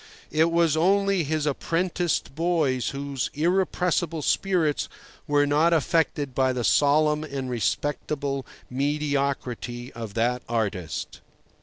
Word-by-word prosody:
It 160 +2 +3
was 165 -2 +3
only 195 +2 +3
his 155 0 -1
apprenticed 170 +1 -1
boys 155 -6 +1
whose 140 -1 -3
irrepressible 175 -1 0
spirits 170 -6 +1 0.4
were 145 0 +3
not 155 +4 +3
affected 155 -3 +1
by 130 0 +2
the 125 -1 -2
solemn 150 +5 +3
and 135 -4 -4
respectable 140 +3 -1 0.2
mediocrity 135 -3 -2
of 115 -3 -7
that 120 +2 +1
artist. 105 -7 -3
145 Hz, 110 wpm, -25 LUFS, 130-165 Hz, 0.4 s, It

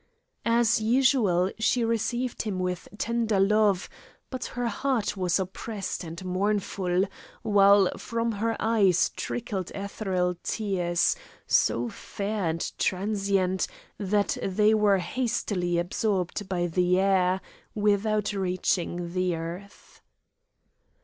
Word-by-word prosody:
As 230 -1 +3
usual, 220 -6 +3
she 230 +2 +2
received 230 +2 -1
him 210 -4 -3
with 180 -1 -3
tender 230 -3 0
love, 205 -1 +3 0.4
but 255 -2 -4
her 245 - 0
heart 235 0 -1
was 180 -2 +1
oppressed 195 +1 -4
and 170 +2 -8
mournful, 185 -1 0 0.4
while 200 -2 +5
from 230 +1 -2
her 225 +1 -1
eyes 200 -6 +3
trickled 205 -7 -4
ethereal 190 -3 -2
tears, 180 -5 0 0.3
so 120 +1 +2
fair 205 - -4
and 165 0 -1
transient, 195 -1 0 0.3
that 200 0 0
they 210 +3 +3
were 210 -2 +4
hastily 180 -3 -1
absorbed 190 +2 -1
by 175 -2 0
the 180 +1 +2
air, 190 -1 +3 0.4
without 210 0 +1
reaching 180 -2 -1
the 185 -1 0
earth. 170 +5 -8
200 Hz, 110 wpm, -27 LUFS, 180-215 Hz, 0.4 s, while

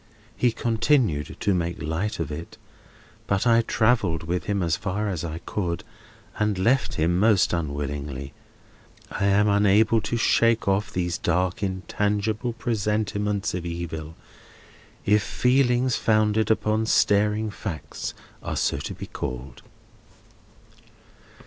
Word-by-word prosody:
He 120 0 +2
continued 115 - +1
to 100 - +2
make 85 -2 -2
light 80 +8 -2
of 80 - -3
it, 80 +3 -7 0.7
but 100 +3 +1
I 115 -1 +5
travelled 110 -8 +1
with 85 +2 -2
him 100 -2 0
as 85 -1 +1
far 105 +3 -2
as 90 -5 -3
I 80 -1 -4
could, 90 -2 -2 0.6
and 105 -2 +1
left 120 +8 +2
him 85 +2 +1
most 105 -4 +4
unwillingly. 70 -3 -4 0.8
I 100 - -1
am 100 +1 +4
unable 105 +2 +4
to 120 - -2
shake 115 -1 +3
off 100 +1 +1
these 90 -2 -2
dark 90 +2 0
intangible 105 +4 -1
presentiments 105 -3 -1
of 90 -1 -3
evil—if 85 +4 -5
feelings 125 +2 +2
founded 110 -1 +2
upon 110 0 +1
staring 105 +1 +2
facts 100 -7 -6 0.3
are - - -4
to - - -1
be - - -7
so - - -19
called. 65 0 -5
100 Hz, 125 wpm, -25 LUFS, 85-110 Hz, 0.8 s, I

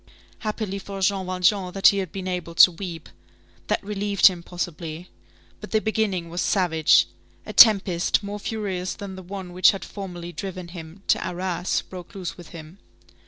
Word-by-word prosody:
Happily 215 -2 -3
for 195 0 -7
Jean 190 -1 +1
Valjean 185 +1 +1
that 195 - +5
he 200 - 0
had 190 - -4
been 190 -1 -6
able 180 -2 -4
to 180 - +8
weep. 170 -2 -7 0.6
That - - 0
relieved 205 -1 0
him, 180 -3 +6
possibly. 170 -1 -6 0.5
But - - -9
the 220 - +2
beginning 215 -5 -1
was 175 +1 -3
savage. 165 -5 +3 0.4
A - - -7
tempest, 195 -5 +5
more 205 +1 -5
furious 195 -4 -3
than 200 -2 -8
the 190 - -8
one 185 -1 -8
which 185 +1 +6
had 195 - -2
formerly 175 -4 -7
driven 185 -1 -6
him 170 +2 -10
to - - +2
Arras, 180 0 -2
broke 180 -1 -11
loose 185 -3 -5
within 165 -2 -11
him. 165 +5 -16
185 Hz, 170 wpm, -24 LUFS, 175-200 Hz, 0.6 s, to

